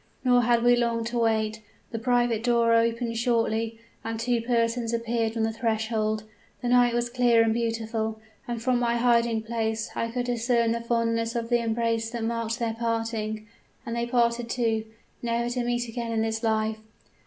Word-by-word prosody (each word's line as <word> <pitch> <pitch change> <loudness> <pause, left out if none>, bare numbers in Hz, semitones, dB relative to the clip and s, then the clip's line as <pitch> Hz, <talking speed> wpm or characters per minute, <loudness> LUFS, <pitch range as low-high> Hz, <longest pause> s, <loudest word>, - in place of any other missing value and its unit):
Nor 245 -1 +5
had 235 0 +2
we 245 0 +6
long 235 -1 0
to 235 +1 -2
wait. 220 -1 +1 0.3
The 225 - -3
private 240 -1 +1
door 235 -1 +3
opened 230 0 +1
shortly, 230 -1 0 0.3
and 225 0 -4
two 235 0 +1
persons 230 0 0
appeared 230 -1 -1
on 225 - +1
the 225 0 0
threshold. 220 -1 -1 0.4
The 245 - 0
night 245 -1 +4
was 240 0 +1
clear 240 -1 +4
and 225 -1 +2
beautiful, 225 -1 -2 0.3
and 240 -1 -3
from 250 +1 +1
my 235 -1 +1
hiding 235 -2 +2
place 225 -1 -2
I 230 - -1
could 245 +1 -2
discern 235 -1 +1
the 235 0 -1
fondness 230 0 0
of 230 -1 -2
the 240 -1 +3
embrace 230 0 0
that 235 -1 -4
marked 230 0 -1
their 230 -3 -1
parting. 225 -2 -2 0.4
And 230 - -3
they 235 0 -1
parted, 235 -1 +1
too, 225 -3 0 0.4
never 235 0 -1
to 245 0 -1
meet 240 0 -1
again 230 0 -4
in 220 -1 +1
this 220 0 -2
life! 220 -1 0
230 Hz, 180 wpm, -26 LUFS, 225-240 Hz, 0.4 s, we